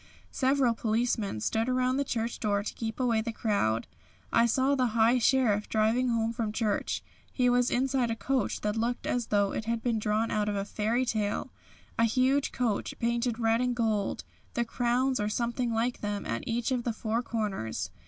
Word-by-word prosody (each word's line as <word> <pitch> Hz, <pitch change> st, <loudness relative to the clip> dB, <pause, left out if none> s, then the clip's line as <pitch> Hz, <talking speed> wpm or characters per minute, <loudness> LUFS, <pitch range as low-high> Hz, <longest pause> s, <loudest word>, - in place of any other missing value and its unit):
Several 265 Hz, -2 st, +2 dB
policemen 220 Hz, -, -1 dB
stood 225 Hz, -, 0 dB
around 255 Hz, +1 st, +1 dB
the 280 Hz, -, +2 dB
church 230 Hz, -3 st, -3 dB
door 205 Hz, -2 st, 0 dB
to -, -, -4 dB
keep 225 Hz, 0 st, -5 dB
away 235 Hz, -3 st, +2 dB
the 230 Hz, +1 st, -3 dB
crowd. 120 Hz, -, 0 dB, 0.5 s
I 230 Hz, +1 st, +5 dB
saw 260 Hz, +4 st, +2 dB
the 250 Hz, -5 st, 0 dB
High 230 Hz, +3 st, +5 dB
Sheriff 230 Hz, -4 st, +2 dB
driving 225 Hz, +4 st, +2 dB
home 230 Hz, -1 st, 0 dB
from 225 Hz, -3 st, -2 dB
church. 215 Hz, -1 st, -1 dB, 0.3 s
He 250 Hz, -2 st, +2 dB
was 245 Hz, 0 st, +3 dB
inside 260 Hz, -1 st, +1 dB
a 225 Hz, -, -1 dB
coach 265 Hz, +3 st, -1 dB
that 210 Hz, 0 st, -1 dB
looked 235 Hz, +2 st, -1 dB
as 245 Hz, -2 st, -1 dB
though 205 Hz, -1 st, +2 dB
it 215 Hz, -, -3 dB
had 230 Hz, 0 st, -2 dB
been 235 Hz, -3 st, +1 dB
drawn 215 Hz, +1 st, 0 dB
out 210 Hz, 0 st, 0 dB
of 205 Hz, -, -1 dB
a 200 Hz, 0 st, -2 dB
fairy 225 Hz, +5 st, 0 dB
tale 210 Hz, -4 st, -1 dB, 0.5 s
a 230 Hz, -, +5 dB
huge 260 Hz, +5 st, +2 dB
coach 235 Hz, -5 st, -1 dB
painted 235 Hz, 0 st, 0 dB
red 225 Hz, 0 st, +2 dB
and 250 Hz, -1 st, 0 dB
gold, 220 Hz, -4 st, 0 dB, 0.3 s
with 235 Hz, -, +1 dB
crowns 245 Hz, +2 st, +1 dB
or 210 Hz, 0 st, 0 dB
something 235 Hz, +2 st, -1 dB
like 230 Hz, +2 st, -1 dB
them 205 Hz, -1 st, -3 dB
at 115 Hz, 0 st, -3 dB
each 235 Hz, +2 st, -1 dB
of 250 Hz, -2 st, 0 dB
the 235 Hz, -, -1 dB
four 225 Hz, +1 st, -1 dB
corners. 190 Hz, -, -3 dB
230 Hz, 195 wpm, -29 LUFS, 215-245 Hz, 0.5 s, I